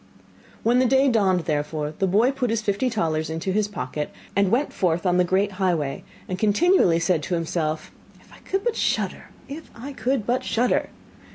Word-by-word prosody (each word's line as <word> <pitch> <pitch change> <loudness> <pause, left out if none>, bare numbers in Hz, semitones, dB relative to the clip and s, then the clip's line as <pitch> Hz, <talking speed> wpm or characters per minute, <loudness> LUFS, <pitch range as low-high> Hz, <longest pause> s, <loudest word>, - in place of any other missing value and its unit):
When 240 +2 +3
the 255 - +3
day 270 +2 +4
dawned, 195 -6 +2
therefore, 150 -1 -2
the 195 - +2
boy 215 +8 +3
put 265 -3 -2
his 225 0 -1
fifty 205 +5 0
talers 160 -8 -1
into 165 +4 -3
his 210 +1 +1
pocket, 155 -7 -4 0.3
and 200 -1 +3
went 255 +8 +1
forth 175 0 0
on 180 -1 +3
the 180 - +4
great 190 +3 +1
highway, 165 -7 0 0.2
and 185 0 -4
continually 215 - +4
said 170 -1 +1
to 175 - -2
himself: 160 -2 -2 0.3
'If - - -21
I - - -15
could 390 +1 -3
but 475 -2 0
shudder! - - -1 0.2
If 300 +4 -9
I 265 +5 -8
could 250 -1 -1
but 245 +2 0
shudder! 245 +2 +1
200 Hz, 190 wpm, -24 LUFS, 170-245 Hz, 0.3 s, day